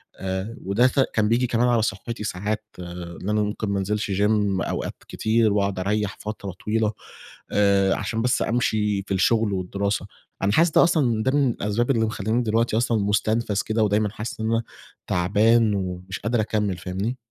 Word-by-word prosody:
آآ، 95 +5 -4
وده 105 +6 +3
سا 135 +1 +2
كان 105 -1 +2
بييجي 120 +2 +2
كمان 120 +1 +2
على 120 -2 +3
صحّتي، 110 +2 -3
ساعات 105 +2 -3
إن 85 +1 -7
أنا 105 0 +2
ممكن 105 0 -2
ما 100 -1 0
أنزِلش 105 +1 -2
gym 100 +2 +2 0.4
أوقات - - -3
كتير 110 -1 +1
وأقعُد 100 -2 0
أريّح 105 +1 -1
فترة 105 -2 -5
طويلة، 110 0 +1 0.6
آآ 100 -1 +3
عشان 110 +2 -2
بس 125 +2 +1
أمشي 105 -4 +1
في 100 - -4
الشغل 110 +2 +2
والدراسة، 100 +2 -2 0.4
أنا 100 - +3
حاسس 165 +9 +4
ده - - +6
أصلًا، 125 -10 +2
ده 130 - +2
من 140 -2 +3
الأسباب 115 +3 0
اللي 115 -4 +2
مخلّياني 110 +2 -1
دلوقتي 115 0 +1
أصلًا 115 -1 +1
مُستنفَز 105 +1 +1
كده 110 0 0
ودايمًا 105 0 +2
حاسس 110 +3 -6
إن 110 0 -1
أنا 115 0 +1 0.4
تَعبان 105 +5 +3
ومش 95 -1 -4
قادر 115 +1 0
أكمّل 105 -3 -1
فاهمني؟ 95 +7 -3
105 Hz, 175 wpm, -24 LUFS, 100-115 Hz, 0.6 s, ده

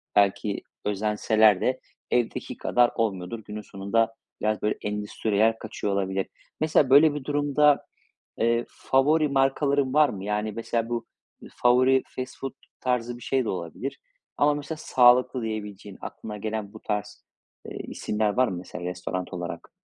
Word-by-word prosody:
belki 100 0 +2 0.2
özenseler 105 0 +3
de 130 0 +1 0.3
evdeki 120 -2 -1
kadar 120 0 +3
olmuyordur. 105 -1 -2
Günün 105 0 -6
sonunda, 105 +4 0 0.3
biraz, 110 0 0
böyle, 105 - 0
endüstriyel 105 +1 +1
kaçıyor 105 -2 -3
olabilir. 95 -1 -1 0.3
Mesela, 155 -3 +3
böyle 145 +3 +7
bir 145 -2 -5
durumda, 145 0 +3 0.5
eee, 115 +1 +2
favori 150 +4 +2
markaların 135 0 +2
var 150 -2 +5
mı? 95 -4 -6
Yani, 105 +1 -1
mesela, 115 +1 -2
bu 120 -1 -2 0.5
favori 130 +2 +4
fast 130 0 -6
food 135 - -4 0.3
tarzı 120 -1 -1
bir 120 - -15
şey 130 +1 +1
de - - -1
olabilir. 90 - -5 0.4
Ama 145 +1 +4
mesela 145 +2 -5
sağlıklı 125 -1 +4
diyebileceğin, 105 -3 -6
aklına 105 -1 -7
gelen 110 -1 -4
bu 110 - -10
tarz, 105 -1 -4 0.4
eee, - - -7
isimler 105 0 -2
var 130 0 +3
mı 90 - -3
mesela 90 0 -7
restoran 90 +1 -4
olarak? 85 -1 -6
115 Hz, 145 wpm, -26 LUFS, 105-130 Hz, 0.5 s, böyle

